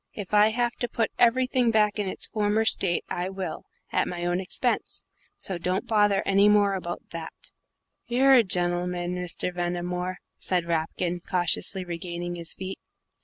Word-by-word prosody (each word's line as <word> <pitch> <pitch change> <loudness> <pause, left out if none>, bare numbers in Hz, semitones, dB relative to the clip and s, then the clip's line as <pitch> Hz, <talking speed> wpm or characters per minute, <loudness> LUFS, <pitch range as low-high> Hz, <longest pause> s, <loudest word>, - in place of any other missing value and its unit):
If 205 -1 -7
I 210 0 +7
have 240 +2 0
to 245 - -2
put 225 -1 -1
everything 250 0 +3
back 210 -2 +2
in 205 - -1
its - - -4
former 215 +1 0
state, 185 -5 +2
I 180 +1 -3
will, 190 -4 -5 0.3
at - - +1
my 175 -1 -4
own 175 +1 +1
expense. 195 +6 -1 0.3
So 185 -3 -2
don't 185 +3 -1
bother 205 -3 +3
any 200 +1 +5
more 205 -1 +4
about 175 -2 -5
that." 165 -1 -7 0.6
"You're 265 +3 +4
a 255 - +8
gen'l'man, 175 -1 0
Mr. 180 0 -3
Ventimore," 180 +1 -2 0.2
said 180 -2 0
Rapkin, 170 +1 -1
cautiously 180 +2 0
regaining 175 0 -5
his 170 -1 -2
feet. 190 0 -6
185 Hz, 160 wpm, -26 LUFS, 175-210 Hz, 0.6 s, a